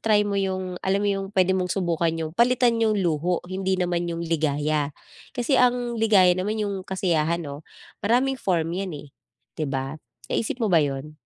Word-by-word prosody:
try 215 -2 +3
mo 205 -1 -2
'yong, 185 -2 -2
alam 195 +1 +1
mo 205 - +1
'yong, 195 -1 -2
puwede 185 -1 +3
mong 185 -1 0
subukan 170 -3 0
'yong, 160 -1 -4
palitan 240 0 +3
'yong 220 -1 +2
luho, 175 -1 0
hindi 190 +1 -1
naman 175 -1 -1
'yong 170 0 -3
ligaya. 150 -2 0 0.4
Kasi 255 +1 +1
ang 245 -1 +1
ligaya 195 -5 +5
naman 210 +4 -1
'yong 200 -2 -3
kasiyahan 170 -3 0
'no? 145 +1 -8 0.4
Maraming 255 +5 +2
form 170 -7 0
yan, 190 -2 -3
eh, 145 - -11 0.5
'di 155 - -1
ba, 135 +2 -3 0.3
naisip 230 +3 -1
mo 215 - +1
ba 170 - +7
'yon? 145 +2 -4
185 Hz, 180 wpm, -24 LUFS, 160-205 Hz, 0.5 s, ba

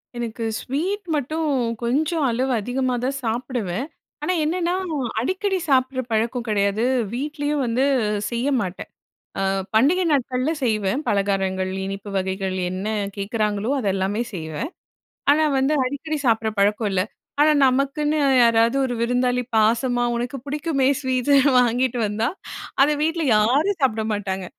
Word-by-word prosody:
எனக்கு 230 -1 -4 0.2
ஸ்வீட் 360 +10 -2
மட்டும் 310 +3 -1 0.3
கொஞ்சம் 300 +6 +1
அளவு 255 +3 0
அதிகமாகதான் 255 +3 -1
சாப்பிடுவேன். 235 -2 -2 0.4
ஆனா, 365 - +1
என்னன்னா 345 +2 0 0.5
அடிக்கடி 380 +6 -1
சாப்பிட்ற 260 -1 +2
பழக்கம் 230 +2 0
கிடையாது. 200 +1 +1 0.3
வீட்லயும் 290 +2 -2
வந்து 240 +3 +1 0.5
செய்ய 235 +2 -2
மாட்டேன். 185 -2 -5 0.5
அ 195 - 0 0.3
பண்டிகை 295 +12 +4
நாட்கள்ல 260 0 0
செய்வேன். 215 +1 0
பலகாரங்கள், 195 -2 0
இனிப்பு 195 +1 -6
வகைகள் 190 0 -2 0.2
என்ன 185 +2 -4 0.3
கேட்குறாங்களோ! 210 +1 -1
அதெல்லாமே 195 0 0
செய்வேன். 160 - -5 0.6
ஆனா, 310 +2 +3
வந்து 270 +3 +2
அடிக்கடி 290 +4 -3
சாப்பிட்ற 225 -1 +2
பழக்கம் 205 +1 +2
இல்ல. 185 -1 +2 0.4
ஆனா, 305 +1 +6
நமக்குன்னு 280 +4 +1 0.3
யாராவது 230 +2 +3
ஒரு 245 - -3
விருந்தாளி 250 +1 +1 0.2
பாசமா 240 +3 +2
உனக்கு 245 +3 -3
பிடிக்குமே 290 -2 0
ஸ்வீட்டு 260 +1 +1 0.3
வாங்கிட்டு 245 +1 +1
வந்தா 220 +3 -1 0.5
அத 280 - +5
வீட்ல 325 +1 0
யாரும் 285 - +2
சாப்பிட 220 -4 +2
மாட்டாங்க. 190 -2 -3
245 Hz, 120 wpm, -22 LUFS, 210-285 Hz, 0.6 s, ஆனா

